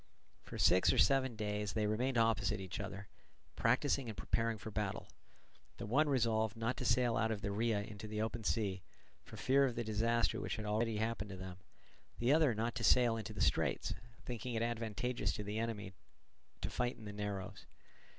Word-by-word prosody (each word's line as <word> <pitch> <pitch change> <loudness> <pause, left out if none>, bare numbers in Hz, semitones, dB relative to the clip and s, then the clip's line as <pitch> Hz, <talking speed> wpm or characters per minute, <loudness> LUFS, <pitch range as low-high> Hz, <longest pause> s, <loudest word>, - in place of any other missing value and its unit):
For - - -8
six 90 +1 +5
or - - +1
seven 130 -3 +4
days 105 -1 -2
they 110 -1 +1
remained 120 +5 0
opposite 115 -4 +2
each 95 -1 -5
other, 100 0 -6 0.5
practising 130 +1 +2
and 105 - -7
preparing 115 -1 0
for 110 - -7
the - - -17
battle; 105 -2 -2 0.7
the - - -5
one 145 +8 +3
resolved 110 -4 +1
not 115 +3 -1
to - - -4
sail 120 -1 +3
out 110 - +2
of 110 -2 -2
the 100 - -1
Rhia 105 -1 0
into 105 0 -8
the 105 0 -4
open 110 0 -2
sea, 100 -4 0 0.4
for - - -11
fear 135 +2 +4
of 130 -4 +1
the 120 - -1
disaster 115 +2 +1
which - - -2
had 110 - -5
already 110 +1 0
happened 110 -1 -2
to 95 - -7
them, 95 -1 -7 0.6
the 120 +4 +3
other 150 -7 +4
not 115 +2 -1
to 115 - -3
sail 120 +2 +5
into 110 -3 -5
the - - -5
straits, - - +1 0.3
thinking 125 0 -4
it 115 - +1
advantageous 120 +1 -1
to 105 - -4
the 105 +2 -3
enemy, 105 -4 -3 0.7
to - - -2
fight 120 0 -1
in 110 - -11
the 105 - -6
narrows. 100 -2 -5
110 Hz, 200 wpm, -36 LUFS, 105-120 Hz, 0.7 s, six